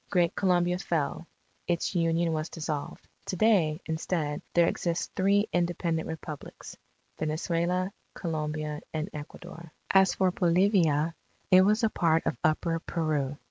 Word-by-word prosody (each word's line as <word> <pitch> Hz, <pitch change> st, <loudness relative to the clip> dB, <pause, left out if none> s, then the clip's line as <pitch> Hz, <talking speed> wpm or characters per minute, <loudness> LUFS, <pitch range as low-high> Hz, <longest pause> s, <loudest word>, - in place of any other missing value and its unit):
Great 175 Hz, -3 st, +2 dB
Colombia 180 Hz, -1 st, +2 dB
fell; 165 Hz, -2 st, -2 dB, 0.4 s
its 175 Hz, +2 st, 0 dB
Union 165 Hz, -1 st, +1 dB
was 155 Hz, +1 st, -2 dB
dissolved. 155 Hz, -3 st, -5 dB, 0.2 s
To -, -, -2 dB
day, 175 Hz, -7 st, +3 dB
instead, 160 Hz, -2 st, -2 dB
there 170 Hz, -1 st, +6 dB
exist 170 Hz, -1 st, -2 dB
three 200 Hz, +2 st, +3 dB
independent 170 Hz, -2 st, 0 dB
Republics 155 Hz, -2 st, -8 dB, 0.4 s
Venezuela, 170 Hz, +4 st, -1 dB, 0.2 s
Colombia, 155 Hz, -2 st, -3 dB
and 155 Hz, +5 st, -3 dB
Ecuador. 165 Hz, +3 st, -9 dB, 0.2 s
As 190 Hz, 0 st, +5 dB
for 190 Hz, -1 st, +2 dB
Bolivia, 170 Hz, -4 st, +2 dB, 0.4 s
it 185 Hz, 0 st, +8 dB
was 210 Hz, +4 st, +3 dB
a 225 Hz, -, +4 dB
part 165 Hz, -2 st, +2 dB
of -, -, 0 dB
Upper 165 Hz, +1 st, +1 dB
Peru. 150 Hz, -5 st, -2 dB
170 Hz, 130 wpm, -28 LUFS, 155-180 Hz, 0.4 s, it